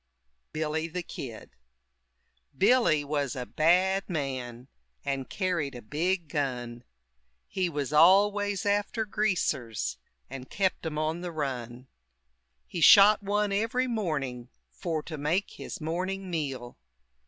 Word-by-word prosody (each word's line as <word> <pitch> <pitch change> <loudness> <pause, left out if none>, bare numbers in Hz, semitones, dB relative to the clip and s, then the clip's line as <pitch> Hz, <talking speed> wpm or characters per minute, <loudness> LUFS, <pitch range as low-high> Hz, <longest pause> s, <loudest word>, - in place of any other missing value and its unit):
BILLY 160 +1 -2
THE 175 +2 -5
KID 115 -8 -8 1.1
Billy 205 -8 +4
was 145 -3 -1
a 125 -1 -4
bad 185 +8 +2
man 130 -6 -4 0.4
And 135 -2 -2
carried 175 -8 -1
a 120 - -7
big 170 - -1
gun, 120 -4 -3 0.6
He 185 -2 -1
was 145 -2 -3
always 200 +5 +4
after 205 +2 0
Greasers 140 - -1 0.3
And 130 -1 -9
kept 190 -4 -1
'em 150 -1 -4
on 155 +2 -1
the 180 -1 -4
run. 130 -5 -4 0.8
He 170 - -5
shot 205 +5 +8
one 205 +1 0
every 225 +5 +1
morning, 145 - -3 0.2
For 160 -3 -3
to 155 -3 -7
make 165 +8 0
his - - -8
morning 185 +4 -3
meal. 135 - -4
160 Hz, 120 wpm, -28 LUFS, 135-195 Hz, 1.1 s, shot